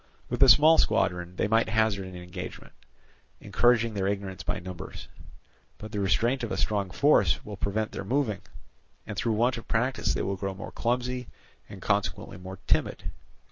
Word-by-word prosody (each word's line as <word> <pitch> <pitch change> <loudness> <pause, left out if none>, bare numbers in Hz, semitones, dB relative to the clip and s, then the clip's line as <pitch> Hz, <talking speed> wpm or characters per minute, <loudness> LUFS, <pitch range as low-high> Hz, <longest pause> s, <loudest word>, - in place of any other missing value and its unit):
With 125 - -3
a 135 - +8
small 155 +7 +7
squadron 90 -5 +1
they 100 - 0
might 115 +1 +2
hazard 110 -3 +1
an 95 - -9
engagement, 90 0 -8 0.7
encouraging 115 -2 +2
their 95 -2 -1
ignorance 100 -2 -3
by - - -2
numbers; 90 -1 -8 0.7
but 110 - -9
the 105 - -3
restraint 115 +7 +1
of 115 - -4
a - - -2
strong 100 -3 0
force 100 - +3
will 105 - -6
prevent 105 +2 -2
their - - -5
moving, 115 -2 0 0.6
and - - -6
through 115 - 0
want 120 +4 +2
of - - -13
practice 125 +4 0
they - - -1
will 95 0 -2
grow 95 0 -4
more 95 - -8
clumsy, 125 +1 -2 0.4
and - - -10
consequently - - -1
more 95 +1 -8
timid. - - 0
105 Hz, 175 wpm, -27 LUFS, 95-120 Hz, 0.7 s, a